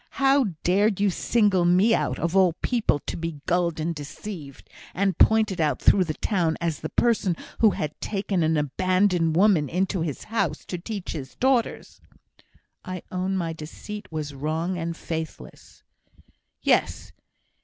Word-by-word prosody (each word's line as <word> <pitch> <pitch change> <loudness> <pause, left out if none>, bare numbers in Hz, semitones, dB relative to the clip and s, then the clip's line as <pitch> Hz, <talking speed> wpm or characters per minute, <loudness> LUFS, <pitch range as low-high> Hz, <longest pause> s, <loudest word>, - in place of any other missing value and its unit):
How 275 0 +4 0.2
dared 200 +3 +2
you 200 -1 +3
single 205 -2 +2
me 185 +6 +4
out, - - 0
of 170 +2 -2
all 185 -3 +5
people, 235 - +1
to - - -4
be 165 -3 -5
gulled 170 -2 0
and 165 +2 -1
deceived, 150 0 -9 0.3
and 195 0 +1
pointed 215 -5 +4
at 150 -2 +1
through 190 -2 +4
the 155 -2 -3
town 170 -6 0
as 165 -3 -2
the 155 - -5
person 220 -7 +1 0.2
who 220 - +6
had 155 -6 -3
taken 195 -3 -1
an 160 0 +2
abandoned 180 +2 +1
woman 180 -6 +4
into 185 0 -1
his 155 -5 -3
house 195 -9 -2
to 180 - -5
teach 200 +1 -5
his 135 -5 -7
daughters?" 260 -3 0 0.8
"I 185 -1 -6
own 185 +1 -1
my 165 -3 -2
deceit 165 +7 -9
was 150 -2 -4
wrong 160 +6 -2
and 170 -1 -4
faithless." 160 - -7 0.8
"Yes! - - +1
180 Hz, 155 wpm, -25 LUFS, 160-200 Hz, 0.8 s, who